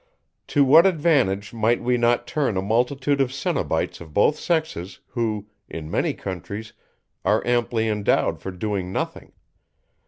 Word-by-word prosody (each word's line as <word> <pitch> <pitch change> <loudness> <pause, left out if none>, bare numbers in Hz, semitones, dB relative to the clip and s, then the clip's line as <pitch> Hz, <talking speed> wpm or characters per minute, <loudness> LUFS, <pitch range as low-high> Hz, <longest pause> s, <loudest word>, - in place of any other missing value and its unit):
To 145 - +3
what 160 +7 +7
advantage 140 - +1
might 115 +1 +2
we 125 0 +1
not 120 0 +2
turn 135 -10 -1
a - - +1
multitude 130 +6 +1
of 130 -2 +1
cenobites 135 -8 -2
of 80 -3 -12
both 125 +8 +4
sexes, 160 - -2
who, 110 -4 -2 0.2
in 80 -1 -7
many - - 0
countries, 100 +4 -6 0.5
are - - +2
amply 120 -2 +1
endowed 105 -2 +1
for - - -6
doing 95 0 -3
nothing? - - -4
115 Hz, 145 wpm, -23 LUFS, 100-135 Hz, 0.5 s, what